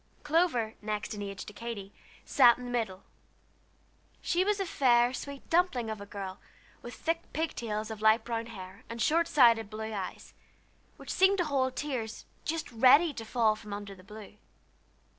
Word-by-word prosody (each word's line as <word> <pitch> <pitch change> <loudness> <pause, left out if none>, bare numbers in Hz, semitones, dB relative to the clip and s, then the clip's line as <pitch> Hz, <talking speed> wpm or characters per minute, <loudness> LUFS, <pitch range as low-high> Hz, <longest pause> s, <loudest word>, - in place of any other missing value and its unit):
Clover, 295 -8 +1
next 210 0 -3
in 210 - -6
age 200 -1 -6
to 210 - -10
Katy, 210 -3 -7 0.3
sat 245 -4 +6
in 250 - -8
the 245 - -5
middle. 215 -6 -2 1.2
She 360 +1 +1
was 415 +1 +1
a 390 - 0
fair, 245 -6 +3
sweet 280 +1 -7
dumpling 325 -10 +2
of 215 -2 -6
a 200 - -9
girl, 195 -1 -6 0.4
with 240 - -8
thick 330 +1 -3
pig 320 +1 -1
tails 215 -1 -3
of 215 -1 -7
light 220 +1 +5
brown 230 -1 -3
hair, 190 -4 -10
and 230 0 -6
short 330 +7 +2
sighted 230 -6 +5
blue 220 +1 -5
eyes, 195 -3 -6 0.6
which - - -7
seemed 385 +1 +4
to 355 - +2
hold 260 -3 0
tears, 250 -7 -4 0.2
just 320 -2 -3
ready 265 +7 +6
to 230 - -6
fall 225 -1 +2
from 210 -1 -9
under 205 -1 -6
the 185 -1 -15
blue. 210 +1 -12
230 Hz, 180 wpm, -30 LUFS, 210-280 Hz, 1.2 s, sat